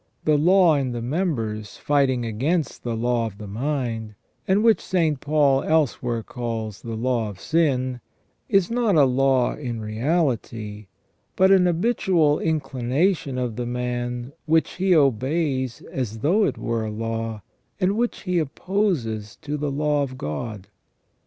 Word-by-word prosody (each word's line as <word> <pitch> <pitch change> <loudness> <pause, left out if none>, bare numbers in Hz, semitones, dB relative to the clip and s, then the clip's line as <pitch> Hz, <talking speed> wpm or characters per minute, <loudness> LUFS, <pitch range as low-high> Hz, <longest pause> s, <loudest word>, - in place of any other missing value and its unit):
The 155 - +4
law 175 +2 +5
in 130 -3 -1
the 120 - -4
members 115 - -2
fighting 135 -4 +1
against 140 +8 -1
the 120 -1 -2
law 120 0 0
of 100 -3 -10
the 105 - -8
mind, 115 -1 -3 0.3
and 195 +3 +3
which 225 -1 +4
St. 160 -6 0
Paul 140 -2 +3
elsewhere 125 -7 0
calls 115 -4 -5
the 115 -1 -5
law 115 -1 0
of 100 -2 -10
sin, 130 -6 0 0.5
is 195 0 +3
not 235 -5 +2
a 145 -3 +6
law 130 -1 +2
in 120 -5 -5
reality, 110 - -2 0.5
but 190 +1 +5
an 185 -2 +5
habitual 175 -5 +2
inclination 140 +1 0
of 125 -3 -2
the 120 -1 -2
man, 120 +1 -3
which 160 +1 +3
he 185 -1 +3
obeys 135 -1 +1
as 115 -5 -3
though 185 - +3
it - - -1
were 115 -1 -2
a 110 - -3
law, 115 -1 -4 0.4
and 190 +1 +2
which 240 +2 -1
he 180 -3 +1
opposes 145 - -1
to 150 0 -3
the 145 0 -2
law 145 +1 +1
of 130 -2 -3
God. 100 +6 -5
130 Hz, 150 wpm, -23 LUFS, 115-160 Hz, 0.5 s, a